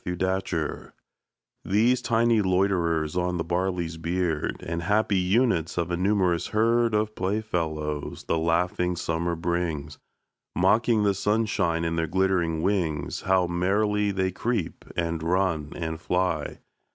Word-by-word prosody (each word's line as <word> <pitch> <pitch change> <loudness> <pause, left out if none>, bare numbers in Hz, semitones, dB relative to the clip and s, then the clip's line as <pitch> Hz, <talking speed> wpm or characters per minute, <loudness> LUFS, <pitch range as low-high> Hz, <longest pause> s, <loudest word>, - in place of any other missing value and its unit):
Insects 90 -3 -2 0.7
These 120 +6 +2
tiny 115 -2 +3
loiterers 90 -4 +1
on 90 0 0
the 85 - -1
barley's 85 -1 -2
beard, 85 -1 -1
And 85 +1 -2
happy 105 +2 +2
units 90 -3 +1
of 85 0 -1
a - - +1
numerous 90 -2 +1
herd 115 +1 +2
Of 105 0 0
playfellows, 80 -8 -2
the 80 - 0
laughing 90 +2 +1
Summer 85 0 -1
brings, 85 -3 -3 0.6
Mocking 115 0 +3
the 100 -1 +3
sunshine 100 -5 0
in 85 0 -1
their 80 0 0
glittering 85 -3 +1
wings, 85 -8 -1
How 95 -1 +4
merrily 100 +4 +1
they 95 -1 0
creep, 110 -1 -3
and 85 -2 -1
run, 85 -3 0
and 80 -1 -4
fly! 90 -4 -1
90 Hz, 125 wpm, -26 LUFS, 85-100 Hz, 0.7 s, How